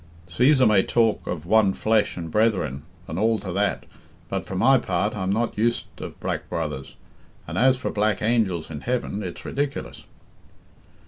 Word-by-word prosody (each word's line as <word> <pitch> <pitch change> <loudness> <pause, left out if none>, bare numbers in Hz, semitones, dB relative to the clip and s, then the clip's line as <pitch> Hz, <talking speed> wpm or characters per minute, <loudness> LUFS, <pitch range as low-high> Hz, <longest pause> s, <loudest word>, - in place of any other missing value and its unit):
Cæsar 125 - +4
may 105 -3 +5
talk 115 +2 +1
of 80 -3 -4
one 100 0 +4
flesh 110 -1 +1
and 85 -2 -5
brethren 95 - +1 0.3
and 80 +3 -4
all 110 +1 +3
to 100 -3 -6
that, 100 +3 0 0.4
but - - -3
for 95 - -5
my 130 +7 +5
part 100 0 -1
I'm 95 -2 -1
not 115 +3 0
used 115 +2 +1 0.2
of - - -8
black - - -3
brothers, 75 -5 -4 0.5
and - - -6
as 130 +1 +4
for - - -3
black 105 0 +1
angels 105 -8 0
in 75 -2 -6
heaven, 120 -4 -2
it's 90 -4 -7
ridiculous." 140 0 -3
105 Hz, 170 wpm, -24 LUFS, 90-115 Hz, 0.5 s, may